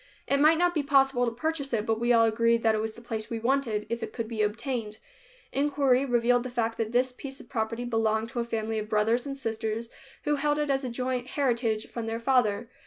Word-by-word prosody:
It 280 - +1
might 310 +2 +6
not 350 +1 +2
be 310 - +1
possible 270 -3 +3
to - - 0
purchase 285 +3 -2
it, 215 -2 0
but 225 0 0
we 240 +1 +2
all 230 -1 +6
agreed 230 +1 +2
that 225 -1 +4
it 215 - 0
was 220 0 -3
the 235 - -14
place 220 -2 -4
we 230 - -3
wanted, 230 -3 0
if 235 0 -3
it - - -5
could 230 -2 -3
be 225 -2 -3
obtained. 215 0 -2 0.5
Inquiry 275 -2 +2
revealed 245 -1 +3
the 255 - -5
fact 230 -2 -2
that 225 -1 -1
this 250 +1 +2
piece 270 +2 -9
of 235 - -14
property 230 +1 -2
belonged 225 -1 0
to 240 - -4
a - - +1
family 225 -1 -2
of 215 0 -6
brothers 225 +5 +1
and 275 0 -4
sisters 225 -2 -3 0.3
who 295 0 +1
held 295 +1 +1
it 295 -1 0
as 270 -1 0
joint 250 +1 -2
heritage 235 -6 0
from 230 -2 -6
their 225 +1 -2
father. 235 -3 +2
235 Hz, 235 wpm, -28 LUFS, 225-270 Hz, 0.5 s, might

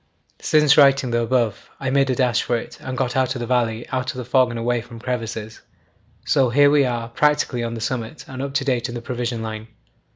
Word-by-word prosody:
'Since 150 -1 +4
writing 135 -3 +5
the 120 0 +1
above 115 -3 -1
I 130 -1 -2
made 135 0 +2
a 130 - +1
dash 125 -3 +2
for 120 - 0
it, - - -9 0.2
got 125 -1 -1
out 130 0 +1
of - - -4
the 120 - -3
valley 120 -2 0
out 130 0 -2
of 145 - -5
the 125 - -5
fog 130 0 +3
and 120 - -5
away 120 +1 0
from 115 0 -12
crevasses. 115 -3 -5 0.6
So 130 -2 +3
here 145 +3 +5
we 145 -2 +4
are 120 -2 -2
practically 145 -2 +1
on 115 0 -3
the 115 - -6
summit 120 +3 -4
and 130 -1 -7
up 140 0 -5
to 135 -2 +1
date 125 -3 0
in 120 - -6
the 120 - -5
provision 120 -1 -3
line. 110 0 -6
125 Hz, 230 wpm, -21 LUFS, 115-135 Hz, 0.6 s, writing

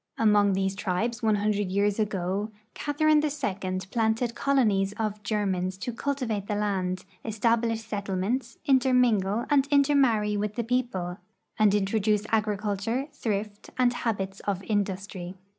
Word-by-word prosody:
Among 210 -2 +4
these 190 0 0
tribes 210 +4 -2
one 220 -1 +3
hundred 205 -1 0
years 200 +2 +1
ago 200 0 -1 0.2
Catherine 305 +1 +2
II 195 -11 -2
planted 230 +1 +1
colonies 215 -8 +2
of 210 -1 -3
Germans 190 -3 -1
to 230 +6 -4
cultivate 230 -6 -2
the 210 - -1
land, 185 -3 -1 0.2
establish 225 +1 +1
set 205 -2 -4
tlements, 225 +6 -2
intermingle 245 -6 +3
and 280 -1 +4
intermarry 270 -7 +3
with 210 0 -2
the 240 - -1
people, 220 -7 -2 0.4
and 210 -1 +5
in 205 -2 +2
troduce 210 0 +1
agriculture, 215 +4 0
thrift, 210 -4 -3
and 250 -1 +3
habits 200 -5 -2
of 195 -1 -1
industry. 195 -3 -3
210 Hz, 135 wpm, -27 LUFS, 195-235 Hz, 0.4 s, and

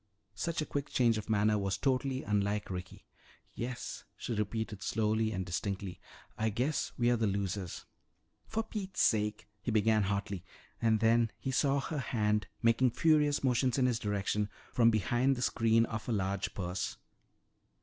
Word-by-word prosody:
Such 155 +10 -2
a - - -5
quick 145 -1 -3
change 115 -3 +3
of 110 - -9
manner 105 0 +3
was 100 -1 -1
totally 135 0 0
unlike 105 0 0
Ricky. 90 0 -7 0.5
"Yes," 120 +1 -5
she - - -3
repeated 105 0 -2
slowly 110 0 +1
and 95 -3 -2
distinctly, 95 +1 -3 0.4
"I 110 +1 +2
guess 130 +8 -1
we're 120 0 +3
the 110 -1 +1
losers 100 -2 -3 0.3
" - - -44
"For 225 0 -1
Pete's 200 -4 -5
sake 105 -4 +1
" 105 - -43
he - - -3
began 110 0 +3
hotly 100 -2 -2 0.4
and 110 -2 +3
then 115 0 +4
he 135 - -3
saw 140 +1 +2
her 150 +2 -3
hand 105 -5 0 0.2
making 115 +2 +4
furious 150 +2 +3
motions 125 0 +2
in 130 - +3
his 120 -3 +1
direction 105 0 -1 0.2
from 115 -2 +5
behind 120 +5 +2
the 125 - -3
screen 115 -1 +3
of 110 -1 -5
her 120 - 0
large 100 -1 -1
purse. 90 -1 -3
110 Hz, 165 wpm, -32 LUFS, 100-125 Hz, 0.5 s, from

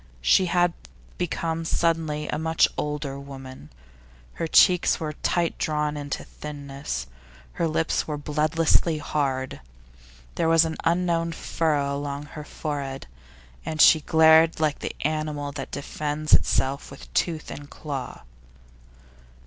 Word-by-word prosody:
She 180 - +4
had 175 0 +2 0.5
become 165 -1 -2
suddenly 160 -2 0
a - - -2
much 160 0 +3
older 150 -2 -3
woman; 135 - -10 0.6
her 165 - -3
cheeks 180 +2 +5
were 155 -1 -3
tight 170 +2 -1
drawn 150 -1 0
into 145 -1 -4
thinness, 140 - -6 0.5
her 165 - 0
lips 160 +1 0
were 150 -1 -3
bloodlessly 155 +2 +1
hard, 135 - -2 0.7
there 165 - +1
was 165 0 +6
an 160 0 -4
unknown 170 -1 +1
furrow 145 -4 0
along 140 0 -4
her 150 0 -9
forehead, 140 -3 -5 0.6
and 155 - -5
she 160 0 +7
glared 160 +1 +5
like 155 -2 +1
the - - -5
animal 150 -1 -2
that 135 -1 -6
defends 150 +1 -3
itself 135 +2 +2
with 140 - -13
tooth 160 -3 -1
and 145 0 -9
claw. 140 -4 -6
150 Hz, 125 wpm, -25 LUFS, 145-165 Hz, 0.7 s, she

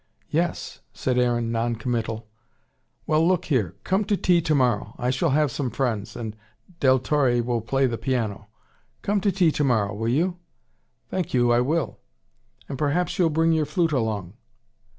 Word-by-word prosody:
"Yes," - - -1
said 125 -1 0
Aaron, 120 -2 +1
non 115 +1 0
committal. 115 -1 -3 0.8
"Well, 155 +1 +2
look 180 -1 +2
here 105 - 0
come 190 +3 +1
to 205 - +1
tea 175 -2 +3
tomorrow. 130 -9 +1
I 125 +1 0
shall 135 +6 +1
have 145 0 +2
some 130 0 -2
friends, 115 -4 -2
and 110 -3 -5 0.4
Del 130 -1 +5
Torre 130 -2 +1
will 120 -1 -1
play 135 +4 +1
the 120 -3 -2
piano. 110 -6 -2 0.6
Come 205 0 +1
to 200 - +2
tea 175 -3 +3
tomorrow, 115 -9 +1
will 115 +3 -2
you?" 175 +8 +1 0.7
"Thank 180 -7 -2
you, 120 -1 +4
I 120 0 +4
will." 155 +4 -1 0.7
"And 135 -2 -6
perhaps 155 +6 0
you'll 170 -3 +4
bring 165 +1 +2
your 155 -2 +1
flute 165 +2 +1
along." 110 - -1
130 Hz, 165 wpm, -24 LUFS, 115-155 Hz, 0.8 s, Del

